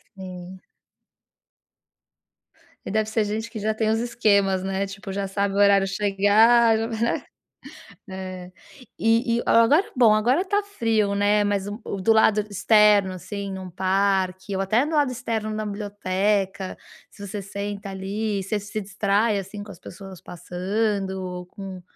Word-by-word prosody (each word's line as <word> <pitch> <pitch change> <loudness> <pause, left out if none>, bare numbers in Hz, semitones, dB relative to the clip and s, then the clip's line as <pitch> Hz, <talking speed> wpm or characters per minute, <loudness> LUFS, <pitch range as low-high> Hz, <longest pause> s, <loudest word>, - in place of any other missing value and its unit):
Sim. 185 -1 -9 2.2
E - - -6
deve 215 0 0
ser 220 0 +1
gente 220 +2 -3
que 220 - -7
já 215 +1 0
tem 220 0 0
os 220 +1 +1
esquemas, 200 -5 +1
né? 195 +1 -1
Tipo, 200 0 -8
já 195 0 -3
sabe 200 0 -1
o - - -1
horário 200 -1 +5
chegar, 210 +4 +4
já 225 +1 -2
vai 225 -2 -5
né. 235 - 0 0.9
É. 185 -1 -7 0.5
E 230 +1 +2
e - - 0
o - - -7
agora, 280 - +5
bom, 225 -4 +6
agora 250 - +2
tá 410 +1 0
frio, 225 - 0
né, 205 +1 +2
mas 200 -1 -1 0.2
o 195 - -5
do 225 +4 +3
lado 220 -1 +4
externo, 210 -1 +4
assim, 195 +2 -6
num 190 -1 -7
parque 190 +1 0
ou 195 - 0
até 220 +7 +2
do 320 - -5
lado 290 -3 +2
externo 225 -3 -3
da 215 - -3
biblioteca, 200 -1 -2 0.3
se 200 -1 -10
você 205 +1 -5
senta 200 0 -6
ali, 200 +1 -3
você 205 +3 -2
se 205 +1 -5
distrai, 205 +1 0
assim, 195 +2 -7
com 205 - -11
as 175 - -14
pessoas 190 0 -11
passando 190 +3 -2
ou 180 -1 -6
com 190 -1 -9
205 Hz, 160 wpm, -24 LUFS, 190-220 Hz, 2.2 s, bom